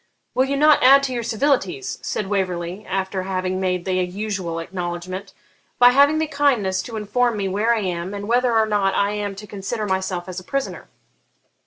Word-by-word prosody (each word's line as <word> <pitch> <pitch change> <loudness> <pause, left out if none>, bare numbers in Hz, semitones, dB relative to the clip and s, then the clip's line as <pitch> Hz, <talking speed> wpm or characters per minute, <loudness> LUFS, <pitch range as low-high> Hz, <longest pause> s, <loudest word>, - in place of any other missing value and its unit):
'Will 260 - +3
you 280 +1 -1
not 300 +1 +5
add 275 +2 +7
to 265 -2 -1
your 240 - -2
civilities,' 225 - -1
said 210 - -3
Waverley, 185 -1 -2
after 190 0 -2
having 185 0 -2
made 180 -2 -1
the 190 - -1
usual 185 -1 -2
acknowledgment, 180 +2 -5 0.5
'by 245 0 +8
having 285 +4 +5
the 315 - +1
kindness 265 -11 +1
to 220 +4 -7
inform 235 +2 0
me 195 -1 -1
where 210 +5 +1
I 220 - -1
am, 180 -1 -3
and 205 0 -6
whether 245 +2 +2
or 220 - +4
not 205 -2 +1
I 200 0 +2
am 205 -1 -3
to 210 +2 -9
consider 210 +2 -4
myself 190 -2 -2
as 185 0 -5
a - - -13
prisoner?' 275 +8 -4
200 Hz, 190 wpm, -22 LUFS, 185-240 Hz, 0.5 s, by